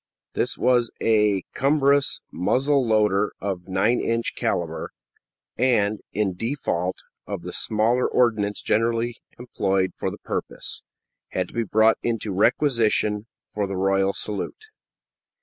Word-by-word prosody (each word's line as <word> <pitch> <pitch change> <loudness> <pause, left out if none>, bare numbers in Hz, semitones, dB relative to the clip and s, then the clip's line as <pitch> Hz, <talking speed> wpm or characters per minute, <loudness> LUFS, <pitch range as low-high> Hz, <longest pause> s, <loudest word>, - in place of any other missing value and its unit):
This - - -1
was 120 -2 +3
a 105 -4 +2
cumbrous 140 0 +3
muzzle 135 - +2
loader 105 -2 +2
of 95 -3 -4
9 95 +6 +2
inch 115 0 -1
caliber, - - -2 0.7
and, 110 -5 +2
in 100 -2 0
default 95 -5 -2 0.3
of - - -5
the - - -6
smaller 115 +3 +1
ordnance 105 -4 +1
generally 115 +1 +1 0.2
employed 95 -6 0
for - - -2
the - - -8
purpose, - - -5 0.5
had 90 -1 -1
to - - -16
be 115 - 0
brought 110 +2 +3
into 115 -3 -2
requisition 110 -2 +2 0.3
for 105 -1 -1
the 95 -1 -4
royal 95 +1 +2
salute. 105 - -5
110 Hz, 125 wpm, -24 LUFS, 100-120 Hz, 0.7 s, was